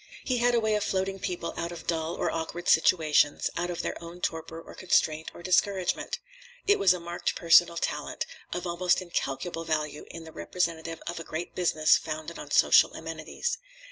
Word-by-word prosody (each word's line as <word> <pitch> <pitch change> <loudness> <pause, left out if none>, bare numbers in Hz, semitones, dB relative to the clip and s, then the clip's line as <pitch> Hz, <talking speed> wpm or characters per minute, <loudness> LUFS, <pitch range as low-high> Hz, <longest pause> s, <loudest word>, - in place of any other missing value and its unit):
He 255 - 0
had 240 0 +3
a - - +4
way 220 -1 +1
of 210 -1 +1
floating 195 0 -1
people 175 -2 -3
out 170 +1 -3
of 170 -1 -9
dull 165 0 -1
or - - -1
awkward 165 +1 -4
situations, 155 -3 +4
out 175 +1 -1
of 175 - -3
their - - -4
own 170 +1 -9
torpor 165 -1 -3
or - - -12
constraint 160 -3 +1
or 175 - -11
discouragement. 190 - +1 0.5
It 405 - +4
was 195 -2 +6
a 180 - +1
marked 170 +1 -3
personal 170 0 +5
talent, - - -2 0.3
of 180 0 -3
almost 175 +1 +2
incalculable 165 -2 -3
value 155 -2 -2
in 165 - -8
the 160 - -11
representative 165 -1 -3
of 170 0 -4
a - - -6
great 165 +2 -5
business 155 -3 +3
founded 155 +2 -6
on 145 - -8
social 145 - +5
amenities. 160 - -4
170 Hz, 185 wpm, -28 LUFS, 160-180 Hz, 0.5 s, was